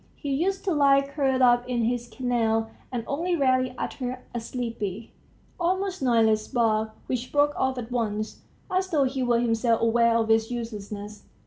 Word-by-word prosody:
He 280 -1 -3
used 380 +7 0
to 375 - +1
lie 280 -2 +5
curled 270 -2 +1
up 245 0 +4
in 240 -2 0
his 240 +1 -1
kennel, 225 -3 0 0.2
and 240 -3 -3
only 340 +5 -1
rarely 255 -3 +2
uttered 255 -1 -4 0.2
a 240 - -2
sleepy, 230 -3 -5 0.5
almost 375 +1 -1
noiseless 225 -4 +3
bark, 220 -2 +1
which 255 -1 -3
broke 290 0 +3
off 265 0 0
at 245 -1 -6
once, 215 -3 -2 0.3
as 370 0 0
though 305 -6 +2
he 265 0 -1
were 240 -2 +2
himself 230 -1 +2
aware 230 0 +3
of 225 -1 +1
its 225 0 +3
uselessness. 210 -3 -6
245 Hz, 165 wpm, -26 LUFS, 225-275 Hz, 0.5 s, lie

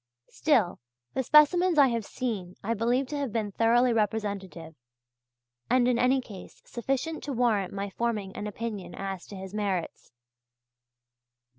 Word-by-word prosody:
Still 245 - +1 0.3
the 265 - 0
specimens 315 +6 +5
I 280 -2 +7
have 230 -3 -2
seen 205 -8 -4
I 225 +3 0
believe 240 +4 +1
to 295 - -3
have 280 -5 -2
been 210 -2 -2
thoroughly 235 +3 +3
representative, 200 -6 -2 1.0
and 250 0 +4
in 245 -1 +2
any 260 +1 +3
case 205 -7 -12
sufficient 270 +6 -3
to 285 - -3
warrant 225 -6 +1
my 200 0 -4
forming 210 -4 -2
an 210 - -4
opinion 210 -2 -5
as 195 -2 -5
to 205 - -9
his 190 0 -8
merits. 200 -5 -3
230 Hz, 145 wpm, -28 LUFS, 200-255 Hz, 1.0 s, I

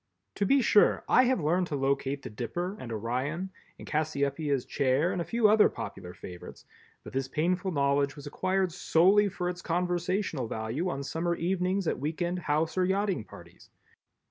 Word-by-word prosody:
To 200 - +1
be 275 +2 +4
sure 210 - +4
I 255 - +5
have 255 -3 +2
learned 175 +3 +1
to 150 - -3
locate 140 0 -1
the - - -6
Dipper 175 - -4
and 120 - -7
Orion 130 - -2 0.3
and - - -11
Cassiopeia's 140 -2 -1
Chair 140 +6 +1
and 180 - -2
a - - 0
few 230 +3 +2
other 210 0 +6
popular 90 -2 -7
favorites, 90 0 -10 0.4
but - - -10
this 135 0 -1
painful 180 +7 0
knowledge 140 -1 +1
was 145 -1 -10
acquired 185 +5 0
solely 190 +4 +4
for 180 -1 -3
its 180 0 -4
conversational 175 - -1
value 115 +12 -2
on 140 -5 -3
summer 170 +4 -1
evenings 185 +2 0
at - - 0
week 155 +3 -3
end, 175 +1 -1
house 155 +2 0
or 185 - +3
yachting 190 - 0
parties. - - -15
165 Hz, 175 wpm, -29 LUFS, 140-185 Hz, 0.4 s, other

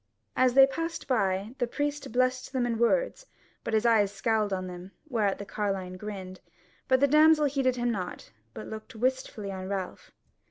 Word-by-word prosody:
As 255 -1 +3
they 270 0 +9
passed 330 +4 -4
by, 200 -3 0
the 245 - +1
priest 290 +2 -3
blessed 255 +2 0
them 255 -2 +1
in 230 -2 -1
words, - - +1 0.4
but 225 - -1
his 220 +2 +2
eyes 215 -4 +4
scowled 210 +1 0
on 185 -1 -2
them, 180 +1 -9
whereat 215 -8 0
the 200 - -7
carline 195 -3 -3
grinned, 185 -2 -7 0.5
but 260 0 +4
the 280 - +6
damsel 305 +1 +5
heeded 270 -2 +1
him 240 -1 0
not, 190 -5 -5 0.2
but 110 - -7
looked 220 +3 -9
wistfully 245 -4 -2
on 190 -1 -6
Ralph. 200 - -5
230 Hz, 175 wpm, -28 LUFS, 195-260 Hz, 0.5 s, they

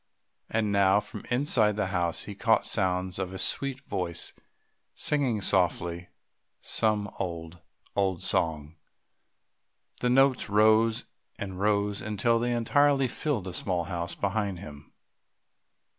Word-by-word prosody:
And 110 -2 0
now 100 0 +4
from - - -8
inside 120 -5 +3
the 105 -1 0
house 85 -2 -1
he 105 - -7
caught 110 +3 +2
sounds 95 -2 0
of 95 -1 -3
a - - -5
sweet 135 +7 +1
voice 90 -9 -3 0.6
singing 130 -8 0
softly 85 -2 0 0.5
some 105 -2 0
old, 85 -1 -5 0.4
old 95 -2 0
song. 80 -2 0 1.2
The 125 - 0
notes 130 -2 +3
rose 110 +2 +3 0.3
and 95 -2 -6
rose 100 0 +1
until 110 +2 +1
they 120 +1 -1
entirely 135 +3 +3
filled 125 -3 -2
the 95 -1 -6
small 90 -1 -1
house 85 -1 -4
behind 100 -1 -2
him. 75 -5 -11
100 Hz, 125 wpm, -28 LUFS, 90-115 Hz, 1.2 s, now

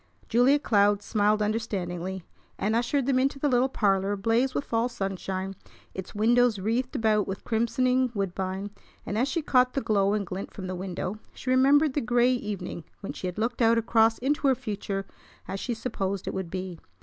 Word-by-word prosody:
Julia 245 +5 +4
Cloud 205 -6 +2
smiled 210 0 +2
understandingly, 190 -4 -3 0.3
and 215 +3 0
ushered 245 +3 +1
them 265 -1 +2
into 275 +1 +1
the 290 - 0
little 255 0 +3
parlor 195 -4 +1
ablaze 225 +6 +1
with 280 - -1
fall 230 +1 0
sunshine, 195 -2 -4 0.4
its 190 +1 -7
windows 235 +1 +3
wreathed 230 +6 -1
about 215 -2 +2
with 190 0 -5
crimsoning 250 +3 +1
woodbine; 195 0 -3 0.3
and, 205 - -3
as 245 +5 +2
she 315 +3 -1
caught 250 -2 +3
the - - 0
glow 205 -4 +2
and 210 -1 -1
glint 185 +2 -6
from 190 - -6
the 185 - -4
window, 185 +2 -4 0.2
she 255 - -3
remembered 275 +3 +4
the 290 - 0
gray 245 +1 +3
evening 210 -7 -4 0.2
when 195 - -5
she 185 - -5
had 180 - -5
looked 230 +3 -1
out 230 0 +5
across 225 0 +3
into 280 +3 0
her 265 - +4
future 205 -5 -4 0.4
as 195 - -4
she 240 +2 -3
supposed 200 -5 -3
it - - -2
would 190 -3 -4
be. 185 -2 -5
220 Hz, 185 wpm, -27 LUFS, 195-250 Hz, 0.4 s, out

